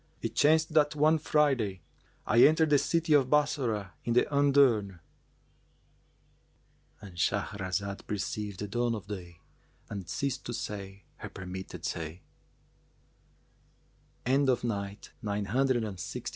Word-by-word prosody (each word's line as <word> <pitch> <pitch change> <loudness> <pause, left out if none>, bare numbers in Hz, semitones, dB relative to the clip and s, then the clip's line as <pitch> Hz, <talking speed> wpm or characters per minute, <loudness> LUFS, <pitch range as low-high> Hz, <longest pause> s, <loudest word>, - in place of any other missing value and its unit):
It - - -2
chanced 155 +1 +3
that 150 -1 +3
one 155 +2 +4
Friday 135 - +1 0.4
I 120 - +4
entered 155 0 +4
the 145 - +6
city 165 0 +1
of 135 -3 +4
Bassorah 125 - +1
in 120 - 0
the 125 - +5
undurn."—And 135 -10 +3 2.2
Shahrazad 100 +1 -2
perceived 105 -1 -4
the 105 - -3
dawn 120 +2 0
of 105 - -7
day 90 -5 -8 0.5
and 100 -4 -6
ceased 140 -2 -2
to 120 - -3
say 100 -2 -6
her - - -8
permitted 95 0 -7
say. 85 +1 -5
115 Hz, 100 wpm, -30 LUFS, 100-145 Hz, 2.2 s, the